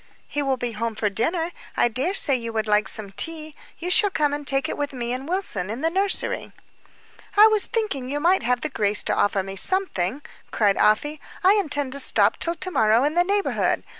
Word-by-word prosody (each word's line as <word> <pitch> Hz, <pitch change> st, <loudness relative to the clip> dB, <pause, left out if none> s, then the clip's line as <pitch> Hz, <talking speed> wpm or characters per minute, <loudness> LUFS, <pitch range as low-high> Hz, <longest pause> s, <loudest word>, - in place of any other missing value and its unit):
"He 290 Hz, -, -3 dB
will 270 Hz, -2 st, -1 dB
be 245 Hz, -1 st, -3 dB
home 225 Hz, 0 st, -4 dB
to 210 Hz, -1 st, -1 dB
dinner. 330 Hz, -, -1 dB, 0.3 s
I -, -, +4 dB
dare 265 Hz, -, -2 dB
say 285 Hz, -, +5 dB
you 230 Hz, -2 st, -5 dB
would 220 Hz, -1 st, -1 dB
like 210 Hz, 0 st, +1 dB
some 205 Hz, -3 st, 0 dB
tea; 310 Hz, +7 st, -3 dB, 0.2 s
you 355 Hz, +2 st, -4 dB
shall 415 Hz, +2 st, +5 dB
come 295 Hz, -6 st, 0 dB
and 290 Hz, -1 st, -5 dB
take 270 Hz, 0 st, +1 dB
it -, -, -4 dB
with 290 Hz, -1 st, -4 dB
me 240 Hz, -1 st, -4 dB
and 265 Hz, +4 st, -6 dB
Wilson, 290 Hz, -, -2 dB
in 230 Hz, +5 st, -5 dB
the 325 Hz, +1 st, 0 dB
nursery." 390 Hz, +2 st, -1 dB, 0.9 s
"I 420 Hz, -, +9 dB
was 435 Hz, -2 st, +3 dB
thinking 410 Hz, -, -3 dB
you 290 Hz, +2 st, -2 dB
might 355 Hz, +5 st, +2 dB
have 245 Hz, 0 st, -1 dB
the 310 Hz, -, -2 dB
grace 210 Hz, -5 st, 0 dB
to -, -, 0 dB
offer 200 Hz, -1 st, +1 dB
me 195 Hz, 0 st, -7 dB
something," 285 Hz, -, 0 dB, 0.3 s
cried 205 Hz, -3 st, +1 dB
Afy. 295 Hz, +8 st, +1 dB, 0.2 s
"I 380 Hz, +2 st, +6 dB
intend 290 Hz, -9 st, 0 dB
to 280 Hz, -, -3 dB
stop -, -, +4 dB
till 335 Hz, 0 st, -1 dB
to 370 Hz, +3 st, -4 dB
morrow 220 Hz, -3 st, +3 dB
in 295 Hz, +2 st, 0 dB
the 350 Hz, +1 st, +3 dB
neighborhood. 400 Hz, +2 st, 0 dB
280 Hz, 220 wpm, -23 LUFS, 225-345 Hz, 0.9 s, I